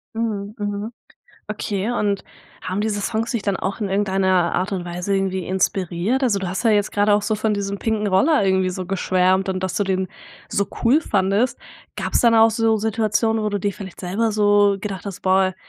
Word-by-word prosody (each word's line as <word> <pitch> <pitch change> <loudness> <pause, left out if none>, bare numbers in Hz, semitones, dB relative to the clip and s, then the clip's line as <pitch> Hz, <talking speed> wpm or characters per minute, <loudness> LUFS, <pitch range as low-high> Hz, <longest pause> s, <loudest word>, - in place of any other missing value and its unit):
Mhm, 215 -2 -3
mhm. 205 +1 -3 0.6
Okay 210 +1 -2
und 205 -4 -1 0.4
haben 185 +3 -3
diese 210 -1 -1
Songs 225 +3 -2
dich 235 -5 -2
dann 200 -2 0
auch 195 +4 -4
in 205 - -1
irgendeiner 190 -3 +1
Art 185 +3 -1
und 185 -2 -2
Weise 180 +3 -3
irgendwie 190 -2 -1
inspiriert? 190 - 0
Also, 210 -5 +2
du 190 - -3
hast 190 +6 -3
ja 225 - +5
jetzt 205 -1 +2
gerade 205 0 +2
auch 205 - +3
so 215 - 0
von 215 0 0
diesem 200 0 -3
pinken 215 -1 -1
Roller 205 +7 +3
irgendwie 190 -1 +2
so 185 0 -5
geschwärmt 185 0 +1
und 185 0 -2
dass 185 -1 -2
du 205 - +1
den 190 -1 -1 0.4
so 200 -1 0 0.2
cool 260 +7 +4
fandest. 200 - +1 0.4
Gab's - - 0
dann 235 -1 +4
auch 225 0 +6
so 225 0 +1
Situationen, 220 +1 0
wo 210 - +1
du 205 -1 -2
dir 200 0 -1
vielleicht 190 -3 -9
selber 210 +5 -1
so 205 -1 +4
gedacht 200 -2 -5
hast: 195 - -6
„Boah, 185 0 +2
200 Hz, 205 wpm, -21 LUFS, 190-215 Hz, 0.6 s, auch